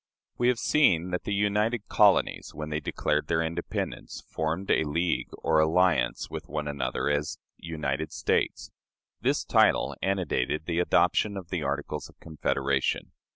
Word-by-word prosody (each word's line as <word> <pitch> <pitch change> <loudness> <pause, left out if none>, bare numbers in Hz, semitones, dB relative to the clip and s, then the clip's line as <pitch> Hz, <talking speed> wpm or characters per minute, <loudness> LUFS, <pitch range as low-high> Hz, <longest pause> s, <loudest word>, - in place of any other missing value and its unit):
We 120 - +3
have 125 -1 +3
seen 90 - +3
that 90 - -3
the - - -3
united 105 +2 +1
colonies, - - +3
when 75 +1 -5
they 75 - 0
declared 75 -1 -1
their 85 -1 +1
independence, 85 +1 -4
formed 80 +5 -2
a - - +3
league 80 +3 -1
or 80 -1 +1
alliance 80 -4 +2
with - - -7
one 75 +1 -3
another 70 -4 -2
as 75 +1 -1 0.2
"United 80 -2 -3
States." - - -1 0.5
This - - +1
title - - +3
antedated 85 -6 -1
the 85 -1 -1
adoption 100 +3 +2
of 90 -3 -8
the 90 -2 -2
Articles 70 0 -3
of - - -21
Confederation. 70 -4 -1
80 Hz, 150 wpm, -27 LUFS, 75-90 Hz, 0.5 s, We